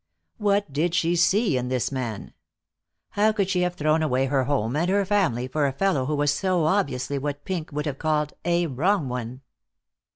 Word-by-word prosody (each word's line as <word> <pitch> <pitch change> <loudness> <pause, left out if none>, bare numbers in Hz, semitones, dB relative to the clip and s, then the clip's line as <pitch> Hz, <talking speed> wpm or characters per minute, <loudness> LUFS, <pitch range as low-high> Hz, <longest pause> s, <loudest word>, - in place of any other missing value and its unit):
What 205 -6 +1
did 165 +4 0
she 170 +1 +2
see 190 - +3
in 125 - -3
the 125 -1 -1
man? 120 -6 -5 0.8
How 210 +2 +2
could 200 -3 -1
she 180 -1 +1
have 180 0 0
thrown 155 0 +1
away 135 -4 +1
her 135 -1 +1
home 130 -3 0
and 170 +4 +1
her 200 +1 +2
family 180 - +1
for 145 +2 0
a - - -1
fellow 140 -4 0
who 150 - 0
was 145 0 +2
so 180 +2 0
obviously 145 -6 0
what 145 +1 -4
Pink 170 -5 -4
would 150 +1 -3
have 140 -3 -4
called 150 -2 0
"a 175 0 +1
wrong 155 +2 0
one"? 125 +1 -5
155 Hz, 195 wpm, -24 LUFS, 135-180 Hz, 0.8 s, see